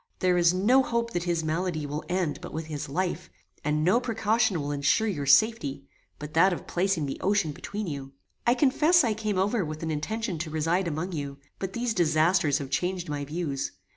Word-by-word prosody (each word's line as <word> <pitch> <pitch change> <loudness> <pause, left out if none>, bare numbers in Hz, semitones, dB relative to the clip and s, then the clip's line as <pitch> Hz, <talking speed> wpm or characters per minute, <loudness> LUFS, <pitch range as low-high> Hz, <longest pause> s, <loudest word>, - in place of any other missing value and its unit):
There 180 -1 +2
is 170 -1 +5
no 210 +9 +4
hope 235 -2 -1
that 175 0 -1
his 170 -2 0
malady 160 0 -1
will 145 +2 -4
end 180 -4 -1
but - - -8
with 160 +1 -4
his 150 -3 -5
life, 175 +2 -2 0.3
and 150 +1 0
no 185 +8 +4
precaution 220 -4 +1
will 145 0 -3
ensure 145 +10 +2
your 145 -9 -2
safety, 145 -10 +3 0.3
but 150 +1 -8
that 180 +4 +5
of 175 - -4
placing 180 -3 0
the 135 - -5
ocean 195 -5 +1
between 205 +8 -5
you. 140 -5 -6 0.3
"I 240 - +5
confess 300 +6 +4
I 230 -3 +1
came 215 -2 -2
over 200 +3 +1
with 155 0 -6
an 160 - -2
intention 200 +4 -3
to 160 0 -3
reside 165 +4 0
among 165 +4 -3
you, 140 -4 -5 0.2
but 190 -1 -4
these 240 -1 -1
disasters 160 -2 +3
have 140 -2 -6
changed 180 +1 -1
my 145 -1 -3
views. 150 -3 -3
175 Hz, 200 wpm, -27 LUFS, 150-205 Hz, 0.3 s, is